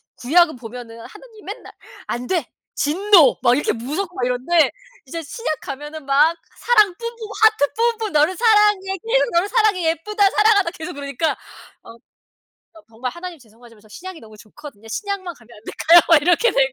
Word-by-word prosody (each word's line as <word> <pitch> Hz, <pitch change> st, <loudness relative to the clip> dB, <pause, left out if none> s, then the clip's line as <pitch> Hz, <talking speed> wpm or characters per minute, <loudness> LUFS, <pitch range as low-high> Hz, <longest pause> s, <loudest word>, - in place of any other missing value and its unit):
구약은 315 Hz, +4 st, +2 dB
보면은 230 Hz, -1 st, -10 dB
하느님이 435 Hz, 0 st, -15 dB
맨날 -, -, -10 dB, 0.3 s
"안 245 Hz, +1 st, -4 dB
돼 350 Hz, +3 st, -1 dB, 0.3 s
진노." 340 Hz, -1 st, +4 dB
막 240 Hz, -, +4 dB
이렇게 295 Hz, -, -1 dB
무섭고 310 Hz, +11 st, -5 dB
막 245 Hz, -, -2 dB
이런데 260 Hz, +7 st, +1 dB, 0.3 s
이제 330 Hz, +5 st, -6 dB
신약 320 Hz, +1 st, -5 dB
가면은 295 Hz, +2 st, -8 dB
막 300 Hz, +5 st, +3 dB, 0.2 s
사랑 425 Hz, -6 st, +3 dB
뿜뿜 465 Hz, 0 st, -7 dB, 0.3 s
하트 435 Hz, -10 st, +3 dB, 0.3 s
뿜뿜 435 Hz, -2 st, -3 dB
"너를 305 Hz, +5 st, +2 dB
사랑해. 415 Hz, -4 st, +2 dB
계속 470 Hz, +6 st, 0 dB
너를 345 Hz, +4 st, +1 dB
사랑해. 420 Hz, -7 st, +1 dB
예쁘다 405 Hz, +5 st, +1 dB
사랑한다." 415 Hz, -4 st, +3 dB
계속 350 Hz, 0 st, -8 dB
그러니까 285 Hz, +2 st, -3 dB, 0.5 s
어 230 Hz, -, -13 dB, 0.8 s
어 325 Hz, -, -16 dB
정말 235 Hz, +3 st, -6 dB
'하나님 345 Hz, +2 st, -9 dB
죄송하지만 230 Hz, -3 st, -20 dB
저 215 Hz, -, -22 dB
신약이 360 Hz, -, -10 dB
너무 215 Hz, -1 st, -15 dB
좋거든요. 225 Hz, +1 st, -14 dB
신약만 380 Hz, -, -5 dB
가면 230 Hz, -2 st, -22 dB
안 210 Hz, -, -19 dB
될까요?' 335 Hz, +2 st, +5 dB
막 325 Hz, -3 st, +6 dB
이렇게 355 Hz, +9 st, +3 dB
되죠. -, -, +1 dB
330 Hz, 375 characters per minute, -20 LUFS, 260-405 Hz, 0.8 s, 막